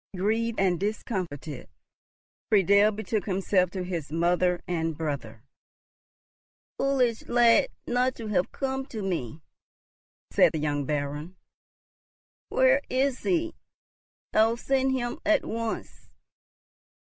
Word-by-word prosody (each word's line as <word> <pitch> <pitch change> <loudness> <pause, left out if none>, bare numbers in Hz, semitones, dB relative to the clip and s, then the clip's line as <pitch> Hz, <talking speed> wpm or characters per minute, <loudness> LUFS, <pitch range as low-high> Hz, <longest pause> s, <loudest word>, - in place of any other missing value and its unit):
Grieved 225 +4 0
and 185 -3 +2
discomfited, 180 - -4 0.8
Friedel 200 +1 +5
betook 215 0 -3
himself 185 -1 +1
to 185 0 -4
his 170 -5 -4
mother 175 +2 +1
and 165 -3 -2
brother. 140 -8 -4 1.4
"Foolish 255 -4 +1
lad 240 - +5 0.2
not 250 +1 +1
to 230 - -7
have 180 -3 0
come 265 -1 -3
to 215 -3 -6
me!" 160 -7 -3 0.9
said - - +5
the 160 - -1
young 145 -1 -1
Baron. 150 +4 -3 1.1
"Where - - +4
is 260 0 +1
he? 335 -2 0 0.8
I'll 225 +2 +4
send 265 +1 +1
him 240 -2 -2
at 315 -2 +2
once." 230 0 -5
200 Hz, 110 wpm, -27 LUFS, 170-240 Hz, 1.4 s, Friedel